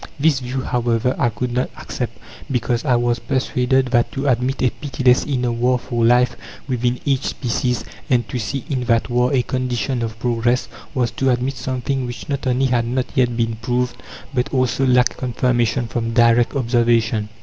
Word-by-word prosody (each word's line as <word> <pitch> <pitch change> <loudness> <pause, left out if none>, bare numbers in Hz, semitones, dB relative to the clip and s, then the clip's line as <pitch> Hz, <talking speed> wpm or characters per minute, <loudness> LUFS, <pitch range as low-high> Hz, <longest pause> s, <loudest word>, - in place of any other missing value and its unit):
This 145 -2 +3
view, 130 +1 -3
however, 120 0 0
I 120 - +3
could 120 +3 -3
not 125 +1 0
accept, - - -5 0.3
because 125 -2 0
I 130 -4 +3
was 120 0 +1
persuaded 130 0 +1
that 120 -2 +2
to 135 +1 -2
admit 130 +1 +1
a 125 - +3
pitiless 130 -4 +1
inner 125 -4 0
war 125 +2 +2
for 120 -1 -2
life 125 +2 +4 0.3
within 125 -1 0
each 135 -2 +1
species, 125 0 -1 0.2
and 120 -2 +2
to 125 - -3
see 125 +4 -3
in 130 -4 -2
that 115 0 +1
war 125 +1 +2
a 130 -3 +2
condition 130 -1 -2
of 110 -1 -4
progress, 120 +1 0 0.3
was 120 -4 +1
to 135 +5 0
admit 125 +2 0
something 130 +1 -2
which 120 - -7
not 140 -1 -2
only 130 +1 +2
had 120 -2 +1
not 125 +1 -1
yet 125 -3 +2
been 115 -1 0
proved, 120 +1 -1 0.4
but 125 -2 -1
also 130 0 +1
lacked 125 -1 +3
confirmation 120 -2 0
from 115 0 -3
direct 120 +2 +4
observation. 115 -4 +1
125 Hz, 180 wpm, -20 LUFS, 120-130 Hz, 0.4 s, life